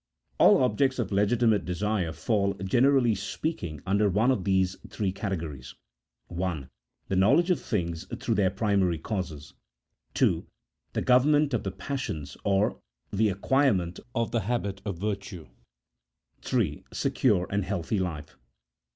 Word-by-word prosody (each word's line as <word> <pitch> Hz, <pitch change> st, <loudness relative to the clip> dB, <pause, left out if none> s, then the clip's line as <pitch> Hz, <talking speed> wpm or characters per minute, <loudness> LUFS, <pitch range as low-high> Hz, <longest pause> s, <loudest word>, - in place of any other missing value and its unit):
All -, -, +6 dB
objects 130 Hz, +1 st, +2 dB
of 115 Hz, -6 st, -2 dB
legitimate 105 Hz, +1 st, +2 dB
desire 95 Hz, -1 st, -1 dB
fall, 100 Hz, +3 st, 0 dB
generally 120 Hz, +6 st, +3 dB
speaking, 95 Hz, -, -4 dB
under 100 Hz, +2 st, +2 dB
one 110 Hz, +7 st, +3 dB
of 100 Hz, -9 st, -1 dB
these 95 Hz, -1 st, +2 dB
three 100 Hz, -4 st, -1 dB
categories: 80 Hz, -, -5 dB, 0.3 s
— -, -, -59 dB
1. 85 Hz, -7 st, -4 dB, 0.4 s
The 95 Hz, -, 0 dB
knowledge 110 Hz, -, +4 dB
of 180 Hz, -, +1 dB
things 85 Hz, -4 st, -2 dB
through 115 Hz, -, -1 dB
their 100 Hz, -3 st, +3 dB
primary 100 Hz, -4 st, +1 dB
causes. 80 Hz, -5 st, -5 dB, 0.6 s
2. -, -, +2 dB, 0.5 s
The -, -, -1 dB
government 145 Hz, +3 st, +4 dB
of 120 Hz, -, +1 dB
the 95 Hz, -, -3 dB
passions, 100 Hz, -, -5 dB
or 100 Hz, +1 st, +1 dB, 0.3 s
the 105 Hz, +2 st, +3 dB
acquirement 100 Hz, -4 st, +1 dB, 0.2 s
of 115 Hz, -2 st, 0 dB
the 115 Hz, -, +1 dB
habit 100 Hz, -4 st, -2 dB
of 100 Hz, -4 st, -3 dB
virtue. 95 Hz, -3 st, -4 dB, 0.9 s
3. 100 Hz, -, -1 dB
Secure 105 Hz, -9 st, +1 dB
and 100 Hz, 0 st, 0 dB
healthy 95 Hz, +1 st, -2 dB
life. 80 Hz, -6 st, -4 dB
100 Hz, 135 wpm, -27 LUFS, 90-115 Hz, 0.9 s, All